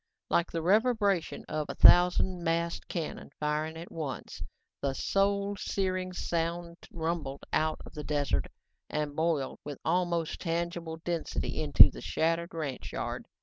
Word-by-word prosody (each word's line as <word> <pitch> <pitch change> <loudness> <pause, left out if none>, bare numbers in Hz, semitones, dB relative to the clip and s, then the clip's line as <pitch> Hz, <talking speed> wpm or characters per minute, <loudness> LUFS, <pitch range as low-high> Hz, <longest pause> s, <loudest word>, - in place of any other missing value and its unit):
Like 170 - +2
the 165 -1 -2
reverberation 205 -2 +2
of 155 -1 -2
a - - -4
thousand 180 0 +6
massed 170 0 -1
cannon 165 -4 -4
firing 155 +1 -1
at 170 +2 -9
once, 150 -5 -5 0.4
the 140 -1 -1
soul 200 +4 +1
searing 185 -2 -1
sound 170 -1 -2
rumbled 160 -4 -3
out 155 0 +1
of - - -12
the 150 - -6
desert 145 - 0 0.4
and 150 -1 -2
boiled 160 -4 0
with 145 -2 -6
almost 170 -1 0
tangible 170 -1 -2
density 170 -2 -2
into - - +8
the - - -9
shattered 165 +1 0
ranch 145 -5 -4
yard. - - -4
165 Hz, 140 wpm, -30 LUFS, 155-175 Hz, 0.4 s, into